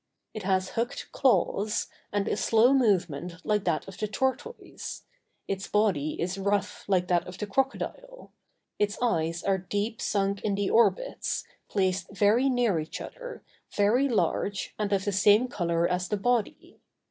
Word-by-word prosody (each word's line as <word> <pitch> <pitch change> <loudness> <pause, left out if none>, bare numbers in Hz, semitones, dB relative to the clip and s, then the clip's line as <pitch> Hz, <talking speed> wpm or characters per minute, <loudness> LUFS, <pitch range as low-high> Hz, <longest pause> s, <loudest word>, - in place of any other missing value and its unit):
It 215 - -5
has 190 -1 +1
hooked 235 +4 -3
claws, 210 -3 +2 0.3
and 205 -1 0
a - - +1
slow 230 +4 +4
movement 180 - +1
like 210 -2 +1
that 155 - 0
of 195 - -10
the 215 - -1
tortoise; 265 - -4 0.4
its 195 0 -3
body 190 -9 +1
is 180 +3 -2
rough 200 +1 -1
like 185 -2 +2
that 175 -1 +2
of 180 0 -8
the 210 - -3
crocodile; 275 - -3 0.5
its 210 0 +1
eyes 165 -8 0
are 195 -1 +1
deep 205 +4 -3
sunk 200 -1 0
in 205 -2 0
the 200 0 -1
orbits, - - +1 0.3
placed 190 -2 0
very 220 +7 +4
near 240 -9 +2
each 155 - -5
other, - - -8 0.3
very 235 +7 +3
large, 200 -3 0
and 210 -1 -1
of 195 -1 +1
the 205 - +1
same 205 +5 +5
color 170 -6 0
as 180 0 -1
the 210 - 0
body. 240 +1 -1
205 Hz, 160 wpm, -28 LUFS, 185-230 Hz, 0.5 s, same